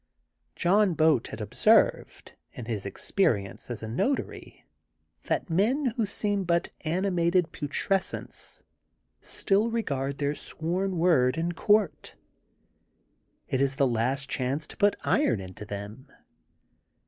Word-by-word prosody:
John 195 Hz, 0 st, +3 dB
Boat 155 Hz, -6 st, +3 dB
had 110 Hz, -, -8 dB
observed, 105 Hz, -, +2 dB, 0.2 s
in 120 Hz, -, -7 dB
his 110 Hz, -4 st, -3 dB
experience 100 Hz, -, -1 dB
as 115 Hz, -2 st, -5 dB
a -, -, -4 dB
notary, 195 Hz, -, -3 dB, 0.6 s
that -, -, -1 dB
men, 240 Hz, -, +2 dB
who 225 Hz, -3 st, 0 dB
seem 205 Hz, 0 st, -1 dB
but 170 Hz, -1 st, 0 dB
animated 175 Hz, 0 st, +1 dB
putrescence, 180 Hz, +6 st, -3 dB, 0.6 s
still 205 Hz, +4 st, +1 dB
regard 140 Hz, -, -2 dB
their 145 Hz, 0 st, 0 dB
sworn 180 Hz, +5 st, -3 dB
word 160 Hz, -6 st, +3 dB
in 170 Hz, +1 st, 0 dB
court. 205 Hz, +2 st, +1 dB, 1.3 s
It 130 Hz, -, 0 dB
is 135 Hz, 0 st, +1 dB
the 140 Hz, -, +3 dB
last 130 Hz, +3 st, 0 dB
chance 135 Hz, +3 st, -2 dB
to -, -, -12 dB
put 205 Hz, 0 st, +3 dB
iron 120 Hz, -5 st, +2 dB
into 95 Hz, +2 st, -9 dB
1 -, -, -19 dB
them. 105 Hz, +7 st, -7 dB
160 Hz, 125 wpm, -27 LUFS, 125-195 Hz, 1.3 s, John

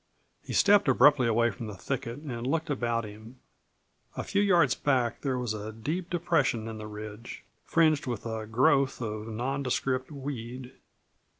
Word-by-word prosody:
He -, -, -7 dB
stepped 200 Hz, -4 st, +5 dB
abruptly 130 Hz, -1 st, +5 dB
away 115 Hz, +1 st, +3 dB
from 110 Hz, +3 st, -7 dB
the 105 Hz, -, -7 dB
thicket 120 Hz, +3 st, -4 dB
and 125 Hz, -5 st, -5 dB
looked 160 Hz, +2 st, -1 dB
about 120 Hz, -4 st, 0 dB
him. 110 Hz, +4 st, -12 dB, 0.8 s
A -, -, -2 dB
few 200 Hz, -, 0 dB
yards 185 Hz, -4 st, +4 dB
back 125 Hz, -5 st, 0 dB
there 135 Hz, -3 st, -1 dB
was 120 Hz, -3 st, -2 dB
a 110 Hz, 0 st, -5 dB
deep 155 Hz, +11 st, -4 dB
depression 145 Hz, -10 st, +1 dB
in 110 Hz, -1 st, -6 dB
the 105 Hz, -, -6 dB
ridge, 105 Hz, +2 st, -8 dB, 0.2 s
fringed 155 Hz, -4 st, +3 dB
with 120 Hz, -4 st, -4 dB
a 110 Hz, -1 st, -4 dB
growth 130 Hz, +4 st, +3 dB
of 110 Hz, -2 st, -4 dB
nondescript 130 Hz, +2 st, -1 dB
weed. 130 Hz, -3 st, -6 dB
125 Hz, 160 wpm, -28 LUFS, 110-140 Hz, 0.8 s, stepped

